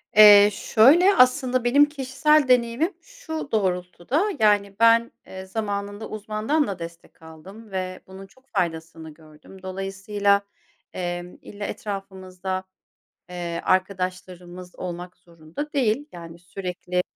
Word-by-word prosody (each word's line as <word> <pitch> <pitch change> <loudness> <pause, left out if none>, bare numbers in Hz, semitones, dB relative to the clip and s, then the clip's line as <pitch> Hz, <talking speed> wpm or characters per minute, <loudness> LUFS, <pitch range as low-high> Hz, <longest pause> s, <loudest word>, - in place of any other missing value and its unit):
Eee, 205 -1 +9
şöyle. 320 - +5
Aslında 255 0 +3
benim 275 +4 +5
kişisel 295 +1 +1
deneyimim 250 - +2
şu 350 - -8
doğrultuda; 185 - -1 0.2
yani 205 -2 +2
ben, 230 0 +4 0.2
eee, 190 0 -9
zamanında 205 +1 -4
uzmandan 215 +8 -1
da 195 -3 -5
destek 170 0 -11
aldım 190 +7 -13
ve 185 -1 -4
bunun 190 +1 -11
çok 260 +6 -26
faydasını 165 -4 -4
gördüm. 155 +4 -17
Dolayısıyla, 195 +2 0 0.5
emm, 175 0 -5
illa 205 0 -8
etrafımızda, 190 -2 -5 0.7
eee, 175 -1 -5
arkadaşlarımız 185 -1 -3
olmak 180 0 -7
zorunda 170 - -9
değil. 265 0 +1
Yani, 170 -1 -11
sürekli, 180 0 -4
195 Hz, 110 wpm, -23 LUFS, 180-230 Hz, 0.7 s, Eee